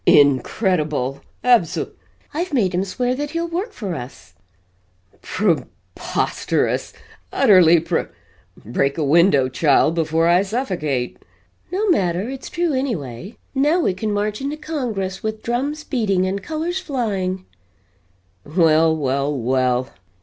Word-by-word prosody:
"INCREDIBLE! 145 - +2 0.2
Abso 235 -10 +2 0.2
" - - -35
"I've 340 +4 -2
made 195 -7 +2
him 180 +2 +1
swear 245 +6 -1
that 290 +3 -3
he'll 335 +2 -2
work 365 +7 -3
for 205 - -5
us!" 120 - -9 0.9
"PRE 175 -9 0 0.3
POSTEROUS! - - -1 0.4
Utterly 175 -4 +6
pre 165 - -1 0.6
break 140 +6 0
a 160 - 0
window, 145 -2 +4
child, 145 +3 +3
before 165 0 +1
I 175 +2 +5
suffocate!" 180 - -2 0.5
"No 405 +4 0
matter, 185 - +1
it's 270 -1 -7
true 345 -3 0
anyway. 195 - -3 0.2
Now 295 +6 +2
we 190 - +1
can 210 +3 -3
march 205 +2 -1
into 285 +2 -3
Congress 230 -12 -3
with 215 0 -4
drums 280 +6 -2
beating 200 -10 0
and 195 +1 -2
colors 325 - -3
flying!" 195 - -2 1.0
"Well 160 0 +3
well 140 0 0
well. 130 0 0
190 Hz, 130 wpm, -21 LUFS, 155-255 Hz, 1.0 s, Utterly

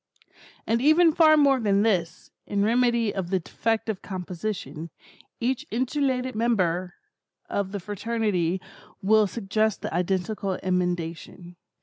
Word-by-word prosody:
And 230 +1 +1
even 315 +3 +5
far 310 -1 +6
more 280 -3 +4
than 205 -3 +2
this, 180 -7 -1 0.2
in 200 -1 0
remedy 235 -1 +2
of 185 -3 -3
the 190 0 +1
defective 220 +3 -2
composition, 180 -4 -5 0.5
each 260 +4 -1
insulated 255 +1 -1
member 185 -6 0 0.5
of 195 -1 -2
the 200 - -4
fraternity 205 -3 -1 0.4
will 215 +1 +4
suggest 215 0 -1
the - - -4
identical 190 +2 -1
emendation. 175 -1 -3
205 Hz, 115 wpm, -25 LUFS, 180-235 Hz, 0.5 s, far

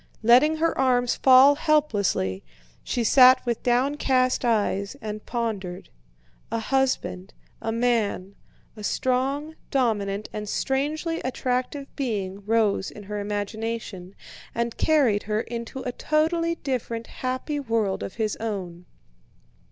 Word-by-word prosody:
Letting 255 +7 +6
her 330 +1 0
arms 245 -2 +2
fall 265 +2 +7
helplessly, 225 - +1 0.4
she 240 - -1
sat 255 +2 +7
with 235 -2 -1
downcast 255 0 +1
eyes 205 -2 0
and 215 -2 -6
pondered. 205 -7 -4 0.6
A - - 0
husband, 230 -6 -1 0.3
a 225 - -2
man, 225 -5 0 0.4
a 210 - -10
strong 270 +7 -1 0.2
dominant 215 -6 0
and 210 -1 -5
strangely 300 +7 -1
attractive 255 +2 -2
being 205 -7 -3
rose 215 -3 +2
in 210 - -11
her 210 +1 -5
imagination, 205 -2 -4 0.4
and 235 0 -1
carried 270 -10 +3
her 215 +1 +1
into 235 +2 -6
a 250 - -2
totally 330 +5 0
different 240 -6 -3
happy 255 +5 -3
world 225 -7 -1
of 190 - -6
his 220 -2 -1
own. 185 -6 -5
235 Hz, 120 wpm, -25 LUFS, 210-265 Hz, 0.6 s, fall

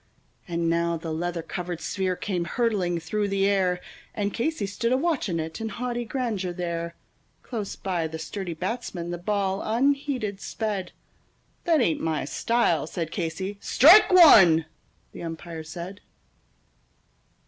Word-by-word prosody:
And 170 -1 -1
now 170 0 +1
the 160 0 -5
leather 170 +1 -3
covered 175 -1 -5
sphere 185 -1 -1
came 180 -2 -2
hurtling 190 -5 0
through 205 +5 -2
the 195 0 +1
air, 185 -3 +2 0.4
And 205 -1 -1
Casey 270 -3 -1
stood 210 +4 -2
a 255 - +4
watching 265 - 0
it 160 +5 -5
in 225 - -2
haughty 240 0 -3
grandeur 220 -7 -2
there; 170 -1 -4 0.5
Close 215 -5 -5
by 175 -4 -2
the 160 0 -6
sturdy 175 +1 -5
batsman 175 -3 -4
the 175 - -4
ball 195 0 -1
unheeded 255 -3 0
sped: 205 -5 -3 0.7
"That 330 -5 +4
ain't 170 -9 +1
my 160 -1 -1
style," 175 -11 +1
said 165 -1 -4
Casey. 185 +3 -4
"Strike 350 +11 +7
one," 195 - +8 0.5
the - - -10
umpire 165 0 -6
said. 175 +5 -8
190 Hz, 140 wpm, -26 LUFS, 170-225 Hz, 0.7 s, one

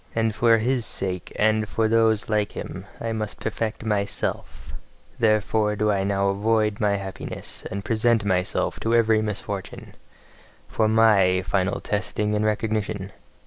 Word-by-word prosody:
And 115 -1 +1
for 115 +1 +4
his 120 +2 0
sake 95 -4 -3
and 110 0 +2
for 110 -1 +1
those 110 -1 +3
like 105 -1 0
him, - - -7
must 110 -2 -3
I - - -12
perfect 110 0 -3
MYSELF: 100 -2 -3 0.5
therefore 110 -1 +2
do 105 0 +1
I 100 -1 0
now 100 0 +1
avoid 105 +1 +1
my 105 -2 +2
happiness, 95 -1 -6
and 100 +1 -5
present 115 -1 +2
myself 90 -2 0
to 115 +1 +1
every 110 -2 +4
misfortune 100 -2 -5 0.7
for 110 - +1
MY 100 -5 +4
final 95 +1 0
testing 105 +1 -2
and 105 0 +1
recognition. 105 -2 -1
105 Hz, 145 wpm, -24 LUFS, 100-110 Hz, 0.7 s, for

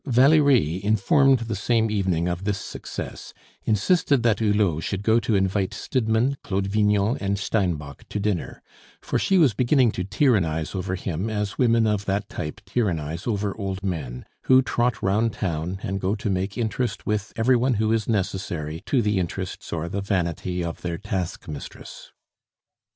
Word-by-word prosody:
Valerie, 130 - +4
informed 130 - +4
the 115 -2 -3
same 110 +2 +1
evening 90 -5 0
of 90 +1 -2
this 100 0 0
success, - - -7 0.3
insisted 130 - +2
that 115 -3 +3
Hulot 105 -7 +2
should 100 +3 -3
go 110 +2 +4
to 115 -2 0
invite 95 0 0
Stidmann, 120 +2 0
Claude 95 -1 -1
Vignon, 105 +3 +2
and 100 0 -1
Steinbock 90 -8 -2
to 105 - -3
dinner; 100 -4 -2 0.4
for - - -1
she 195 - +2
was 150 -10 +5
beginning 125 +2 +3
to 90 - -3
tyrannize 95 - +1
over 95 -1 -2
him 95 +2 -3
as 105 -2 -3
women 115 -3 +4
of 105 -2 0
that 100 +1 -1
type 75 - -5
tyrannize 85 -7 -2
over 100 -3 -1
old 95 -1 -4
men, 75 -10 -4 0.2
who 130 0 +6
trot 120 -1 0
round 105 +4 +2
town, 85 0 -2
and 95 0 -3
go 95 +3 0
to 105 -1 -2
make 95 +3 -2
interest 120 +1 -2
with 105 -1 -1
every 120 +3 +3
one 125 +1 +2
who 110 +1 +1
is 115 0 -1
necessary 90 -7 -2
to 130 -4 +2
the 105 -2 +1
interests 90 +1 -4
or 85 0 -2
the 100 +3 -3
vanity 90 -2 -1
of 85 -1 -5
their 85 -1 -3
task 90 0 -4
mistress. 75 - -9
100 Hz, 165 wpm, -24 LUFS, 90-115 Hz, 0.4 s, who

